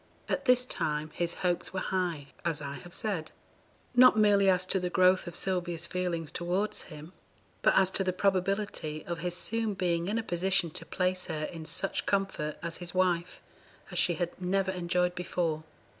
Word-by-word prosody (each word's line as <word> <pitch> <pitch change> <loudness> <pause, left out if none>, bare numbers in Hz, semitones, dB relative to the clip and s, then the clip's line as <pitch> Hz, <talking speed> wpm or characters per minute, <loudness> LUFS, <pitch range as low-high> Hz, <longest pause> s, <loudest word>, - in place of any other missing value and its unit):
At 275 - -1
this 250 -1 +5
time 150 -8 -2
his 175 -1 -1
hopes 175 0 0
were 190 - -1
high, 175 -7 -2
as 165 -4 0
I 140 -1 -5
have 175 0 -12
said, 195 -9 -1 0.6
not 250 -2 +7
merely 200 -2 +5
as 185 -1 +3
to 190 +1 +1
the 180 0 -2
growth 185 0 +4
of 175 - -6
Sylvia's 175 -3 -1
feelings 175 -3 -2
towards 190 +5 -1
him, 155 +2 -10 0.5
but - - +4
as 190 -1 +4
to 195 - +1
the 185 - +1
probability 185 -4 0
of 170 -1 -4
his 180 0 -2
soon 225 +1 -1
being 175 -2 0
in 210 +3 0
a 230 - -1
position 185 -2 +1
to 165 0 -5
place 185 0 0
her 155 -1 -3
in 160 0 -6
such 175 +5 -1
comfort, 195 -6 -1
as 170 -1 -3
his 175 0 -7
wife, 180 -1 +1 0.5
as - - -1
she 175 - +3
had 175 +2 -4
never 190 +1 +1
enjoyed 180 0 0
before. 175 -3 -1
180 Hz, 185 wpm, -30 LUFS, 170-190 Hz, 0.6 s, not